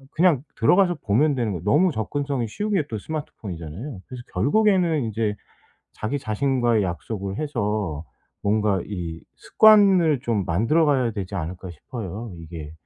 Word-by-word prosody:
그냥 160 -6 +3
들어가서 175 - +4
보면 140 +9 +3
되는 115 -4 -1
거 85 - -4
너무 155 - +3
접근성이 135 +1 -2
쉬운 210 - -3
게 185 - +3
또 110 -4 -4
스마트폰이잖아요. 100 - -7
그래서 125 -2 -8
결국에는 170 - +2
이제 110 -1 -1 0.6
자기 135 +7 -3
자신과의 120 -1 +1
약속을 95 +2 -4
해서 105 - -2 0.4
뭔가 105 -2 +1
이 85 -5 -5 0.2
습관을 195 - +5
좀 115 -6 -1
만들어 115 - +2
가야 130 -5 +2
되지 100 -2 -5
않을까 90 +1 -5
싶어요. 105 +5 -7
이게 80 -2 -9
115 Hz, 330 characters per minute, -23 LUFS, 100-145 Hz, 0.6 s, 습관을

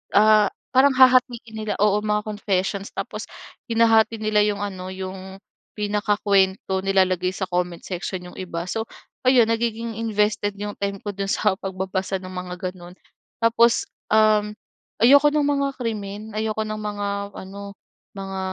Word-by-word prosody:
ah, 215 0 +6 0.3
parang 270 +1 +6
hahatin 255 -2 +5 0.2
nila. 215 -1 -2
Oo, 210 0 +4
mga 210 0 +1
confessions. 200 -1 -2
Tapos - - -5 0.4
hinahati 225 -1 +4
nila 215 -1 +2
yung 205 -1 -1
ano, 190 -2 -5
yung 190 0 -7 0.4
pinakakuwento, 205 -2 +1
nilalagay 185 -2 +2
sa 190 - -3
comment 180 -1 -1
section 180 0 -5
yung - - -15
iba. 170 -2 -4
So, 220 +4 -2 0.4
ayun 250 -3 +6
nagiging 230 0 -2
invested 210 -2 0
yung 205 0 -4
time 200 0 -2
ko 205 - -4
dun 195 0 -3
sa 210 -3 +2
pagbabasa 190 0 -3
ng 185 0 -9
mga 180 -1 -6 0.2
ganun. 175 -1 -13 0.5
Tapos, 230 0 +4 0.3
um, 215 -1 +4 0.5
ayoko 285 +5 +7
nung 295 -1 +1
mga 280 -1 0
krimen, 215 -2 -4
ayoko 220 0 -1
ng 215 0 -5
mga 205 -1 -3 0.3
ano, 200 +1 -9 0.4
mga 195 -1 -5
205 Hz, 145 wpm, -23 LUFS, 190-220 Hz, 0.5 s, ayoko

